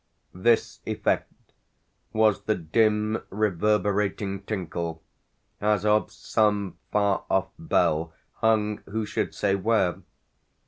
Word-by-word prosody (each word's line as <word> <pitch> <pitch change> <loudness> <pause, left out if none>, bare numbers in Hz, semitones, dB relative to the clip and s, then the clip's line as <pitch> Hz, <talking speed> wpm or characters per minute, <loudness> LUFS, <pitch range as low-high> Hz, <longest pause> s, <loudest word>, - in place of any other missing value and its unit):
This 115 +6 +1
effect - - 0 0.8
was 110 -2 +2
the 110 - +2
dim 105 +5 +1
reverberating 100 0 0
tinkle 85 -5 -4 0.6
as 105 -1 +2
of 105 0 +3
some 105 -3 0
far 100 -2 +2
off 95 0 +1
bell 85 - +1 0.3
hung 105 -2 +2
who 110 +2 -2
should - - -2
say 100 -2 +1
where? 100 -2 +1
105 Hz, 100 wpm, -26 LUFS, 95-110 Hz, 0.8 s, of